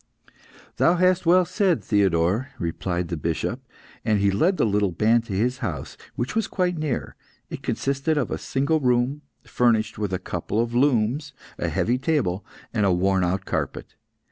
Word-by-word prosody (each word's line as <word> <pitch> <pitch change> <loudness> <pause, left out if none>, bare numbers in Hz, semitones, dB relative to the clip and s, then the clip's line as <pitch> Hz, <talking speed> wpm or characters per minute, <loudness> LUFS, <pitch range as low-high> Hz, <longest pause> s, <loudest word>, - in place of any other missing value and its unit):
"Thou 170 - +4
hast 185 0 +2
well 180 +1 +6
said, 180 0 +1
Theodore," 100 +4 +2
replied 85 +1 -2
the 85 - -3
Bishop, 85 - -2 0.4
and 110 -2 +2
he 100 0 +3
led 170 - +2
the - - +2
little 105 -2 +2
band 110 +6 +2
to 105 - -6
his 125 +6 0
house, 85 - -4 0.2
which 125 - -3
was 225 -2 +1
quite 180 -2 0
near. 155 -5 -3 0.4
It - - -6
consisted 140 +3 -1
of 140 - -1
a - - -2
single 140 +4 0
room, 125 +2 +1 0.2
furnished 110 -3 +1
with 105 -2 -2
a 95 - 0
couple 90 +3 -3
of 115 0 0
looms, 135 +2 +1 0.3
a - - -1
heavy 125 +3 0
table, 130 - 0 0.3
and 110 -3 +1
a 100 - +3
worn 95 +1 +2
out 95 +2 -1
carpet. - - -3
115 Hz, 170 wpm, -24 LUFS, 95-145 Hz, 0.4 s, well